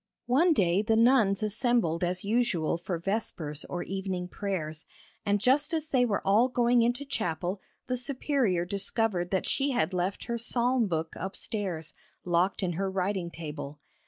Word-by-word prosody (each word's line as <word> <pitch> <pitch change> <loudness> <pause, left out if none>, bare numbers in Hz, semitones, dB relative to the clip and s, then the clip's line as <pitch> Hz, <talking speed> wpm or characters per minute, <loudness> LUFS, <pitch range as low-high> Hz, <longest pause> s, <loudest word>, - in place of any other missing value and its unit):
One 300 +9 +4
day 185 - +2
the 220 +1 +1
nuns 225 -4 +4
assembled 215 -6 +2
as 180 +1 -1
usual 210 -7 +1
for 175 0 -3
vespers 165 -5 -3
or 175 - -4
evening 190 -2 -4
prayers, 165 -7 -4 0.4
and 205 0 +3
just 290 - +2
as 315 -1 -3
they 255 -4 +3
were 210 -4 -1
all 220 +6 +4
going 245 -1 +3
into 245 +4 0
chapel 180 - -2 0.2
the 250 - -1
Superior 250 - +1
discovered 200 -1 0
that 190 0 0
she 275 +1 +1
had 240 -6 0
left 180 +2 -1
her 235 0 -3
psalm 240 0 +1
book 160 -2 -2
upstairs, 190 -2 -4 0.3
locked 180 +3 +1
in 180 - 0
her 190 +3 -1
writing 190 -1 -1
table. 150 -3 -7
200 Hz, 160 wpm, -29 LUFS, 175-240 Hz, 0.4 s, One